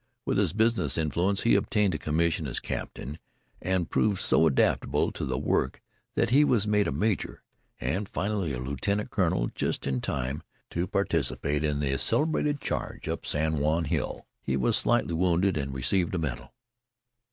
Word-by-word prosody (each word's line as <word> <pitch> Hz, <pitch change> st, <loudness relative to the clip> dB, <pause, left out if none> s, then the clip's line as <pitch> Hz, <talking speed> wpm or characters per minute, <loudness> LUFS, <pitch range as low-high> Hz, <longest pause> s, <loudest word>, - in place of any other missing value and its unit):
With -, -, +1 dB
his 95 Hz, -6 st, +2 dB
business 110 Hz, -, +2 dB
influence 85 Hz, +5 st, +1 dB
he 115 Hz, -, +3 dB
obtained 105 Hz, -4 st, +2 dB
a 75 Hz, -, -2 dB
commission 80 Hz, 0 st, 0 dB
as 65 Hz, -, -3 dB
captain, 75 Hz, +5 st, -5 dB, 0.4 s
and 95 Hz, -2 st, 0 dB
proved 100 Hz, -3 st, +1 dB
so 80 Hz, -, +4 dB
adaptable 70 Hz, -, +2 dB
to -, -, -4 dB
the 65 Hz, -1 st, -2 dB
work -, -, 0 dB, 0.4 s
that -, -, +1 dB
he 140 Hz, +4 st, +6 dB
was 115 Hz, -7 st, +2 dB
made 105 Hz, -1 st, +3 dB
a -, -, -1 dB
major, 100 Hz, +9 st, -1 dB, 0.4 s
and 95 Hz, +4 st, -2 dB
finally 100 Hz, -5 st, -1 dB
a 65 Hz, -, -3 dB
lieutenant 70 Hz, +11 st, -2 dB
colonel -, -, +1 dB
just -, -, -2 dB
in 65 Hz, -2 st, -1 dB
time 65 Hz, +2 st, -2 dB, 0.3 s
to 85 Hz, +2 st, -1 dB
participate 75 Hz, -5 st, 0 dB
in 75 Hz, -1 st, 0 dB
the 70 Hz, -2 st, 0 dB
celebrated 150 Hz, -1 st, +1 dB
charge -, -, -4 dB
up -, -, -3 dB
San 80 Hz, 0 st, 0 dB
Juan 80 Hz, +3 st, +1 dB
Hill. 75 Hz, -, -2 dB, 0.2 s
He 65 Hz, 0 st, -1 dB
was 65 Hz, -, +2 dB
slightly 85 Hz, -, +2 dB
wounded, 90 Hz, +2 st, +2 dB
and 70 Hz, -2 st, -2 dB
received 80 Hz, +8 st, 0 dB
a -, -, +1 dB
medal. 65 Hz, -6 st, -4 dB
80 Hz, 170 wpm, -28 LUFS, 70-100 Hz, 0.4 s, he